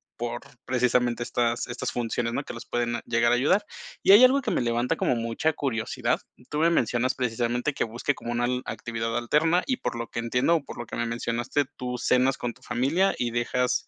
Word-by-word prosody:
por 120 0 -4 0.2
precisamente 125 -1 +1
estas 120 0 0
estas 120 0 -4
funciones, 120 0 -2
¿no?, 140 - -1
que - - -8
las 115 +1 -9
pueden 120 -1 -1
llegar 120 0 +3
a - - +5
ayudar. 185 +12 +2 0.4
Y - - +6
hay, 210 +5 +9
algo 265 +2 +6
que - - -1
me - - +1
levanta 120 +1 0
como - - +1
mucha 115 +7 0
curiosidad. 115 -7 -1 0.3
Tú 150 - -1
me 165 +2 +4
mencionas, 130 -5 +1
precisamente 120 +3 -1
que - - 0
busque 120 +5 -1
como 120 - -6
una 120 0 0
al 125 +1 0
actividad 115 0 -3
alterna, 155 +9 +2
y 255 - 0
por - - -3
lo 115 0 -4
que - - -4
entiendo, 125 +7 +2
o 160 - -1
por - - -10
lo 120 - -5
que - - -7
me 120 0 -1
mencionaste, 120 +4 -1
tú 125 0 -4
cenas 125 +2 +2
con 120 -1 -3
tu - - -24
familia, 140 +11 +1
y 120 -1 -1
dejas 125 +1 0
120 Hz, 215 wpm, -26 LUFS, 120-135 Hz, 0.4 s, hay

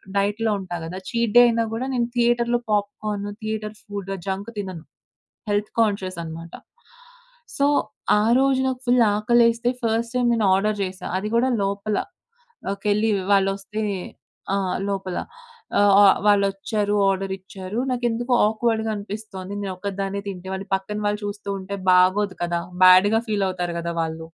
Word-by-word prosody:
డైట్‌లో 210 +3 +1
ఉంటా 180 -2 -6
కదా! 175 +3 -6
చీట్ 235 -3 0
డే 245 - +10
అయినా 230 -1 +1
కూడా 245 +3 -2
నేను 240 -1 +1
థియేటర్‌లో 240 0 +2
పాప్‌కార్ను 205 0 -2
థియేటర్ 215 0 -4
ఫుడ్ 200 -2 -6 0.2
జంక్ 195 +3 -3
తినను. 185 -5 -5 0.7
హెల్త్ 205 +1 0
కాన్షియస్ 200 -5 0
అన్నమాట. 165 +1 -8 1.0
సో 280 - +3 0.5
ఆ - - +2 0.2
రోజు 270 -1 +3
నాకు 255 -1 -3
ఫుల్ 245 0 +4 0.2
ఆకలేస్తే 235 +2 +3
ఫస్ట్ 230 +1 0
టైమ్ 245 -1 +2
నేను 220 -3 +1
ఆర్డర్ 210 +2 0
చేశా. 185 0 -6
అది 210 +2 -4
కూడా 255 +3 +3
లోపలకెళ్ళి 210 - -3 0.2
వాళ్లోస్తే 195 +2 0 0.7
ఆహ్, 190 -2 -1
లోపల. 190 -2 -3 0.6
ఆహ్, 205 -1 +5
ఆ! - - +8 0.2
వాళ్ళచ్చారు. 205 +1 +1
ఆర్డరిచ్చారు. 190 +2 -4
నాకెందుకో 240 0 -1 0.2
ఆక్వర్డ్‌‌గా 225 0 0
అనిపిస్తుంది. 200 -2 -7
నేను 195 -2 -3
ఒక్కదాన్నే 195 0 -3
తింటే 190 0 -7
వాళ్ళు 195 +1 -7
పక్కన 210 +2 -4
వాళ్ళు 210 +1 -1
చూస్తూ 205 0 -6
ఉంటే 200 +1 -6
బాగోదు 185 +1 +3
కదా! 170 0 0 0.2
బ్యాడ్‌గా 195 +5 +7
ఫీల్ 200 -2 +1
అవుతారు 175 -2 -3
కదా! 170 0 -3
వాళ్ళు. 160 0 -5
205 Hz, 140 wpm, -23 LUFS, 190-225 Hz, 1.0 s, డే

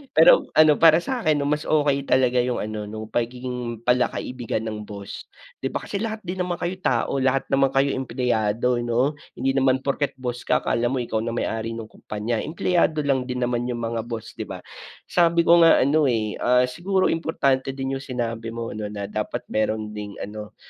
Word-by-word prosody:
Pero - - +7
ano 155 -1 +6
para 165 +1 +6
sakin 160 - 0
mas 150 +2 -1
okay 145 -2 +2
talaga 125 -1 +3
yung 125 0 +1
ano 105 0 -5
nung 110 +1 -6
pagiging 120 -1 -3
pala-kaibigan 125 -2 0
ng 105 -1 -5
boss. 100 -1 -8 0.3
Di 135 - -2
ba - - -4
kasi 200 - -4
lahat 220 0 -4
din 185 +1 -5
naman 180 -1 -1
kayo 175 0 -2
tao, 130 -4 0
lahat 135 +1 +2
naman 135 0 +4
kayo 135 +1 +2
empleyado 125 -2 0
no, 120 +4 +1 0.2
hindi 135 +2 0
naman 130 -1 +2
porket 140 0 -1
boss 125 -2 -5
ka - - +2
akala 120 +1 +1
mo 130 0 -1
ikaw 110 -2 -2
na 115 +1 -3
may - - 0
ari 115 0 -3
ng 115 -1 -8
kompanya, 110 +2 -3
empleyado 160 -1 +1
lang 135 -3 0
din 125 -1 -2
naman 120 0 -1
yung 120 -1 -3
mga 115 0 -3
boss 115 -2 -6
di - - -4
ba. - - -8 0.4
Sabi 170 -1 +3
ko 170 +1 +6
nga 165 -4 +6
ano, 145 +2 +3
eh, 110 -4 -1
ah, 125 +1 +4
siguro 180 +9 0
importante 135 -5 0
din 135 0 -3
yung - - -10
sinabi 115 -3 -4
mo 115 0 -4
ano 105 0 -4
na 100 -1 -6
dapat 105 0 -3
meron 110 0 -1
ding 105 -1 -7
ano, 105 +1 -8
125 Hz, 195 wpm, -23 LUFS, 115-145 Hz, 0.4 s, Pero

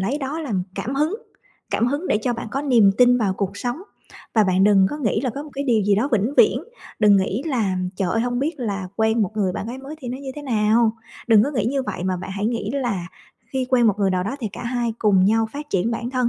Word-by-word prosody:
lấy 250 +10 -1
đó 285 +4 -4
làm 210 - -2
cảm 260 - -3
hứng, 305 +8 +1 0.6
cảm 235 - +1
hứng 290 +8 -2
để 210 - +2
cho 245 - 0
bạn 230 -1 -5
có 275 +4 -2
niềm 235 -8 +5
tin 245 0 +6
vào 195 -4 0
cuộc 200 0 -3
sống. 245 +7 -4 0.5
Và 220 - +5
bạn 190 0 +3
đừng 195 -2 +5
có 295 - -4
nghĩ 220 -5 0
là 255 -1 -1
có 280 +5 -6
một 300 - -11
cái 280 +1 -3
điều 230 -5 +2
gì 200 +1 +3
đó 230 +8 +1
vĩnh 225 +6 +1
viễn, 445 - +5 0.4
đừng 210 -2 +6
nghĩ 195 +6 0
là 220 -10 0 0.2
"Trời 190 -3 -1
ơi, 225 - +1
hông 245 +1 -1
biết 300 +6 -1
là 200 -5 -3
quen 220 0 +2
một 195 - -1
người 190 -3 +1
bạn 205 - -4
gái 250 +3 -6
mới 275 +3 -8
thì 250 - -6
nó 255 +2 -4
như 275 -1 -6
thế 295 - -6
nào?" 225 -2 +2 0.3
Đừng 220 -3 +6
có 285 - -2
nghĩ 240 -8 -1
như 270 +2 0
vậy, 185 -7 -5
mà 185 -1 0
bạn 185 +2 -7
hãy 200 +2 -2
nghĩ 225 -3 -2
là 205 -10 -2 0.5
khi 260 -1 -1
quen 245 -3 +4
một 210 -1 +2
người 195 -1 +2
nào 180 -1 0
đó, 230 +7 -3
thì 220 - -2
cả - - -7
hai 240 -1 -1
cùng 195 -4 +4
nhau 225 +2 +3
phát 295 +1 -7
triển 195 +4 +1
bản 235 +1 -3
thân, 255 -2 +1
230 Hz, 275 wpm, -22 LUFS, 205-265 Hz, 0.6 s, tin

